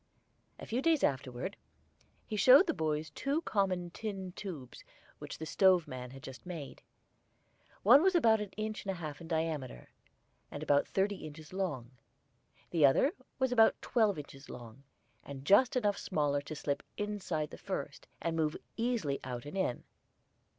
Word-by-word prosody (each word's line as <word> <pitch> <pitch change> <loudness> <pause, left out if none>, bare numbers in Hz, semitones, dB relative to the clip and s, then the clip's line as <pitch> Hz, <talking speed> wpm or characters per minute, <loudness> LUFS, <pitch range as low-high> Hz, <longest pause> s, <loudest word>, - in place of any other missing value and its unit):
A - - -9
few 240 +3 -1
days 320 -2 +3
afterward 135 +6 -1 0.7
he 215 - -4
showed 255 - +8
the - - 0
boys 155 -2 -2
two 280 - -1
common 185 - 0
tin 195 -2 -5
tubes 170 -10 -8 0.4
which - - -7
the 160 - -5
stove 180 -1 +4
man 125 -2 -6
had 135 +1 -12
just 130 -2 -9
made. 165 -6 -7 1.0
One 245 +8 +8
was 380 +1 +3
about 225 -9 +5
one 210 -1 -4
inch 215 0 -3
and 200 - -6
a 190 - 0
half 155 -3 -6
in 165 - -9
diameter, 160 - -3 0.6
and - - -6
about 145 0 +3
thirty 195 +1 0
inches 155 +1 -10
long; 145 -11 -3 0.8
the 165 -3 +2
other 140 - +5 0.3
was 260 -1 +1
about 225 -2 +5
twelve 215 -6 +2
inches 140 -1 -10
long, 120 +1 -10 0.4
and 140 -1 -9
just 215 - +5
enough 210 -5 +1
smaller 145 -4 0
to 150 +2 -7
slip 145 -1 -2 0.2
inside 190 -7 -2
the - - -8
first, - - -5 0.2
and 165 0 0
move 155 -2 0 0.2
easily 225 - 0
out 125 -1 -5
and 145 - -7
in. 185 -11 -1
170 Hz, 165 wpm, -33 LUFS, 145-210 Hz, 1.0 s, showed